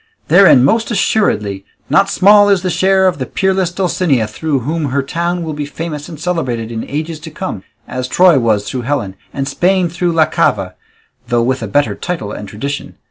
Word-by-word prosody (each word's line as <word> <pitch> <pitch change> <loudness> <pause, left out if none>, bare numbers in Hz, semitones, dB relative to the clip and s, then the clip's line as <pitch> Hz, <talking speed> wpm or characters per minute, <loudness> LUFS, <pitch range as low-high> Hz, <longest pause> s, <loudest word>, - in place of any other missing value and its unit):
Therein, 175 -8 +6
most 225 +9 +1
assuredly, 105 - 0 0.2
not 195 - +3
small 205 +2 +5
is 195 -3 +2
the 185 - -1
share 190 +1 +3
of 180 - -1
the 130 - -3
peerless 190 -2 0
Dulcinea, 175 - 0
through 140 +6 -2
whom 155 +5 -2
her 140 0 -1
town 170 +4 -2
will 160 -1 -4
be 145 -1 -4
famous 150 -1 -6
and 160 -4 -9
celebrated 130 -10 -2
in 115 -1 -4
ages 155 +2 -4
to 160 - -9
come, 155 - -5 0.3
as 130 0 -4
Troy 175 0 +4
was 110 -4 0
through 130 - -3
Helen, 120 -7 -2 0.2
and 135 -1 -3
Spain 180 +4 +1
through 175 +1 -1
La 160 -1 +4
Cava, - - 0 0.5
though 120 -1 +1
with 130 +1 -1
a 115 - -3
better 115 0 +1
title 160 - -4
and 105 -1 -7
tradition. 140 +7 -5
155 Hz, 190 wpm, -15 LUFS, 125-180 Hz, 0.5 s, Therein